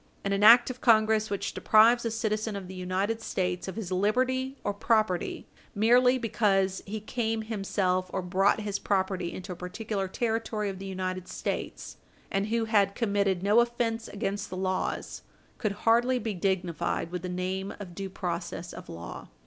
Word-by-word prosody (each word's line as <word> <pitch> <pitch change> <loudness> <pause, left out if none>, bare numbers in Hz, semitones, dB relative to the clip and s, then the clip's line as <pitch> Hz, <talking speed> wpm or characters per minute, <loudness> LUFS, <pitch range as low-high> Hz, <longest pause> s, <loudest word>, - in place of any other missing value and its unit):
And 200 - 0
an 200 - 0
act 240 +3 +8
of 255 - -11
Congress 220 -2 +4
which 200 -1 -3
deprives 230 +3 +5
a - - +1
citizen 220 -1 -1
of 195 -2 -6
the 190 - -8
United 190 +5 -2
States 180 -4 -2
of 190 - -5
his 205 -5 -5
liberty 255 +7 +1
or 205 - -1
property 215 -3 0 0.3
merely 245 +4 +5
because 195 -5 +1
he 215 +2 -4
came 225 0 -2
himself 195 -4 -1
or 190 - -2
brought 195 +4 +2
his 205 -1 -2
property 190 -3 0
into 185 +1 -7
a - - -4
particular 195 +3 -4
Territory 220 0 -1
of 190 -1 -6
the 195 - -6
United 185 -1 -4
States, - - -4 0.3
and 195 +1 0
who 225 +1 0
had 205 -3 +2
committed 200 -5 +1
no 205 +3 +5
offence 235 -1 0
against 205 +1 -3
the 185 - -6
laws, 185 0 -2 0.4
could 215 -3 0
hardly 240 +3 +4
be 225 -3 -3
dignified 175 -3 -1
with 180 -1 -3
the 180 - -5
name 185 +2 -3
of 190 -4 -8
due 195 +2 -5
process 175 -1 -4
of - - -10
law. 85 +1 -8
200 Hz, 175 wpm, -28 LUFS, 185-225 Hz, 0.4 s, act